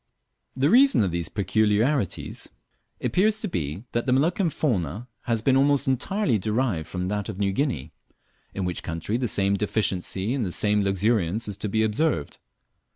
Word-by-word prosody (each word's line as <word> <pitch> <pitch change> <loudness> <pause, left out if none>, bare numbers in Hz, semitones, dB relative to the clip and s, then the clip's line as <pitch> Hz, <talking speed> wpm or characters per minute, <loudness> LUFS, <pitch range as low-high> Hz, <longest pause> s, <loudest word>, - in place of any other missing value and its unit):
_ - - -52 0.6
The 140 +3 +3
reason 265 - +6
of 95 - 0
these 85 -1 -2
peculiarities 110 - 0 0.5
appears 215 +3 +2
to 215 - -2
be, 80 - -3
that 120 +3 -2
the - - +2
Moluccan 165 +7 +2
fauna 105 - -2 0.2
has 115 -2 0
been 130 +1 +3
almost 140 +1 +3
entirely 135 - +1
derived 105 -5 -1
from 90 +1 -3
that 105 -1 -2
of - - -5
New 100 -1 +1
Guinea, 95 - -2 0.6
in 95 - -2
which 90 -1 -3
country 85 +6 -3
the 125 -1 -1
same 100 -2 +2
deficiency 100 0 -1
and 135 -3 -1
the 95 - -2
same 105 +3 +2
luxuriance 100 +1 0
is 105 - -2
to 105 - -3
be 110 +2 +1
observed. 110 - 0
110 Hz, 170 wpm, -25 LUFS, 95-135 Hz, 0.6 s, reason